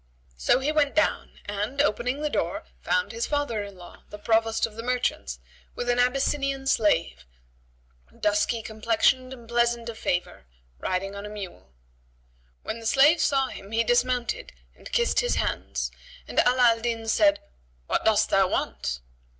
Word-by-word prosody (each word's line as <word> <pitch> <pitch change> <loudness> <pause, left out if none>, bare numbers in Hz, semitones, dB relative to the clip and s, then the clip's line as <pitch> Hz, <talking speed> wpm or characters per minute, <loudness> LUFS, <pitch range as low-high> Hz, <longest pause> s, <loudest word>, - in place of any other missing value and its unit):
So 60 - +3
he 270 +3 0
went 295 -2 +1
down; 310 - 0
and, 205 +7 -3
opening 270 +1 +1
the 300 - +1
door, - - -1 0.2
found 485 0 0
his 470 - -2
father 285 -7 -1
in 200 -2 -8
law, 175 -1 -13
the 210 - -8
Provost 225 +1 +2
of 225 - -9
the 230 - -5
merchants 250 +1 -1 0.4
with 245 - -4
an 245 0 +2
Abyssinian 275 +2 +1
slave, 70 - +1 1.0
dusky 210 +2 +1
complexioned 230 +4 +1
and 240 -3 -10
pleasant 235 0 +1
of 225 -1 -8
favour, 175 - -2 0.3
riding 195 +2 -2
on 200 +1 -6
a - - -8
mule. 195 - -9 0.9
When 230 - -4
the 225 - -4
slave 290 +7 +5
saw 270 -2 +2
him 200 +2 -10
he 230 +1 +3
dismounted 245 - 0 0.2
and - - -12
kissed 475 -1 +2
his - - +1
hands, - - -2 0.4
and - - 0
Ala 245 -1 +5
al 230 - -2
Din 225 -1 -3
said, 300 +6 +4 0.5
"What - - 0
dost - - +3
thou - - +4
want?" - - -2
235 Hz, 160 wpm, -26 LUFS, 210-270 Hz, 1.0 s, slave